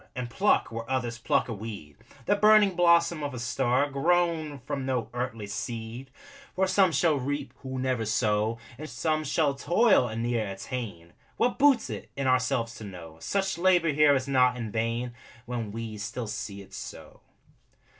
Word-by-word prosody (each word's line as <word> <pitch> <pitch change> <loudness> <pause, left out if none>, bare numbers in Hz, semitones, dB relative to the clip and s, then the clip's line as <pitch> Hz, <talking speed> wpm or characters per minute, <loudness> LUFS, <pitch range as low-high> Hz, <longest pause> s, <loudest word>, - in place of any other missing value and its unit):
And 125 -2 -4
pluck, 200 - +2
where 115 +1 -6
others 120 -3 -2
pluck - - +1
a 120 - -4
weed, 100 -9 -8 0.3
The 205 - +3
burning 210 -1 +6
blossom 170 -2 +4
of 145 -2 -4
a - - -5
star, 130 +2 +1
Grown 160 0 +1
from 135 0 -3
no 130 -3 -1
earthly 120 -3 -3
seed. 115 +5 -5 0.5
For 190 - +2
some 190 -1 +3
shall 155 -1 +2
reap 135 -1 -3
who 130 -1 -6
never 130 -3 -1
sow; 110 0 +1 0.2
And 155 0 -7
some 155 -1 -1
shall 150 0 +1
toil 175 - +3
and 115 0 -4
ne'er 120 -3 0
attain 95 -6 -6 0.2
What 245 - +1
boots 275 -4 +4
it, - - -7
in 140 - -2
ourselves 125 -3 +1
to - - -9
know 85 -5 -10
Such 195 - -1
labor 175 -3 +4
here 150 -1 +5
is 135 0 -1
not 125 -2 +3
in 115 -3 -5
vain, 115 +2 -2 0.3
When 120 -4 -4
we 110 -1 -6
still 105 +4 -4
see 105 -2 -6
it - - -19
so! - - -9
130 Hz, 175 wpm, -28 LUFS, 115-155 Hz, 0.5 s, burning